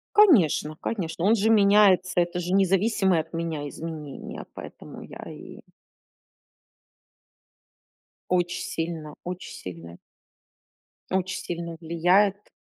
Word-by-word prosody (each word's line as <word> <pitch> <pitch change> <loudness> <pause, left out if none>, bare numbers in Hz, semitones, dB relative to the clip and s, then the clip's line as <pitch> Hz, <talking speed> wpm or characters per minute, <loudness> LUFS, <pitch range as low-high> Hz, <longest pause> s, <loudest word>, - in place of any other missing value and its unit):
Конечно, 200 - +5
конечно, 170 -6 -3
он 210 +4 +5
же 220 0 +1
меняется, 200 -4 +5
это 175 0 0
же 180 +1 -3
независимые 195 -1 +3
от - - -15
меня 165 -3 -3
изменения, 155 -2 -7
поэтому - - -10
я - - -10
и - - -11 2.8
Оч 175 0 0 0.2
сильно, 165 -2 -4 0.2
оч 180 0 -5 0.2
сильно 85 -2 -9 1.2
оч 190 0 -2
сильно 170 -1 -5
влияет. 185 +5 +2
175 Hz, 100 wpm, -25 LUFS, 165-200 Hz, 2.8 s, Конечно